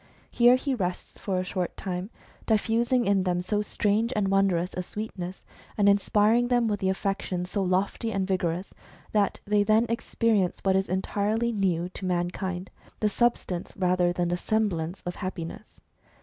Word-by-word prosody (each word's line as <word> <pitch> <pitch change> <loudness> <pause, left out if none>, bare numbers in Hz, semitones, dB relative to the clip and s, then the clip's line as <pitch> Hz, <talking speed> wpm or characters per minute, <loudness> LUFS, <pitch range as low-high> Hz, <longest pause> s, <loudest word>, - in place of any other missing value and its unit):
Here 240 +1 +6
he 270 +1 -1
rests 180 -7 -4
for 190 -2 -2
a 185 - 0
short 180 -1 -3
time, 185 +1 -4 0.4
diffusing 235 +3 +2
in 195 -1 +3
them 180 -1 0
so 205 +3 0
strange 210 +2 0
and 200 -2 +1
wondrous 195 -2 +2
a 180 - -2
sweetness, 190 -2 -6 0.3
and 205 -1 +4
inspiring 210 +4 +4
them 245 -2 +2
with 205 -2 -1
affections 190 -1 -1
so 200 - 0
lofty 190 +4 0
and 195 -2 0
vigorous, 180 -1 -1 0.4
that 205 -2 +1
they 205 0 +3
then 215 +2 +4
experience 230 -4 +1
what 190 -1 +3
is 190 0 +1
entirely 210 +5 0
new 185 -5 0
to 190 - -7
man 175 -1 0
kind, 185 -1 -4 0.3
the 210 - +2
substance 205 -6 0
rather 180 -1 +2
than 175 0 -1
the 175 - 0
semblance 185 -5 -1
of 180 - -5
happi 185 -3 -4
ness. - - -11
195 Hz, 165 wpm, -27 LUFS, 180-215 Hz, 0.4 s, Here